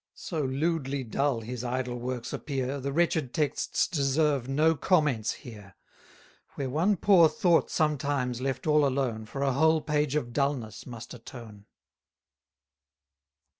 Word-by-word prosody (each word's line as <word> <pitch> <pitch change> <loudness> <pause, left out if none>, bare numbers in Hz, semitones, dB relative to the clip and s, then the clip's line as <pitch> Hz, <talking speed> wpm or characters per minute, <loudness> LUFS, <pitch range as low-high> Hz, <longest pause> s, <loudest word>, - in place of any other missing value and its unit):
So 160 -4 -4
lewdly 140 0 -1
dull 130 +1 0
his 120 +2 -6
idle 125 0 -2
works 125 0 -4
appear, 135 -1 -3
The 140 +1 -3
wretched 155 -4 0
texts 150 -2 0
deserve 140 -3 +1
no 155 +4 +3
comments 145 - +1
here; 105 -5 -11 0.8
Where 135 -2 -3
one 180 +8 +2
poor 175 -4 +6
thought 175 -6 +2
sometimes, 140 -5 0
left 135 0 -2
all 150 -1 +4
alone, 130 -5 -1
For 140 +4 -4
a 135 -2 +1
whole 160 +3 +4
page 150 -2 0
of 120 -6 -2
dulness 140 -6 -2
must 120 -2 -8
atone. 115 -4 -11
135 Hz, 130 wpm, -28 LUFS, 125-150 Hz, 0.8 s, poor